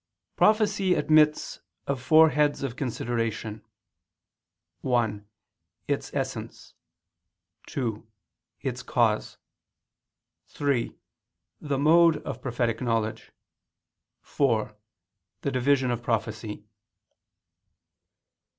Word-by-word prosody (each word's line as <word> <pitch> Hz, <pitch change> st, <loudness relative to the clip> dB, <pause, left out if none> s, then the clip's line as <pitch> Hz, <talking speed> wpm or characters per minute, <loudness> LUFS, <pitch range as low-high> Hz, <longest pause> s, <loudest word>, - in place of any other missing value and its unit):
Prophecy 210 Hz, -3 st, +3 dB
admits 150 Hz, -1 st, +3 dB, 0.3 s
of 140 Hz, -2 st, -2 dB
four 155 Hz, +4 st, +6 dB
heads 145 Hz, 0 st, +1 dB
of 130 Hz, -3 st, -3 dB
consideration: 115 Hz, -4 st, -3 dB, 1.2 s
(1) 110 Hz, -5 st, -1 dB, 0.6 s
its -, -, -2 dB
essence; -, -, -5 dB, 0.9 s
(2) 115 Hz, -6 st, -3 dB, 0.6 s
its -, -, -3 dB
cause; -, -, 0 dB, 1.1 s
(3) 140 Hz, -5 st, -1 dB, 0.6 s
the 145 Hz, -2 st, -2 dB
mode 165 Hz, +2 st, +5 dB
of -, -, -6 dB
prophetic 120 Hz, -2 st, -1 dB
knowledge; 115 Hz, -3 st, -2 dB, 0.9 s
(4) 110 Hz, -6 st, 0 dB, 0.7 s
the 140 Hz, -, -1 dB
division 130 Hz, 0 st, +2 dB
of 120 Hz, -1 st, -2 dB
prophecy. 110 Hz, -2 st, -3 dB
130 Hz, 75 wpm, -26 LUFS, 115-150 Hz, 1.2 s, four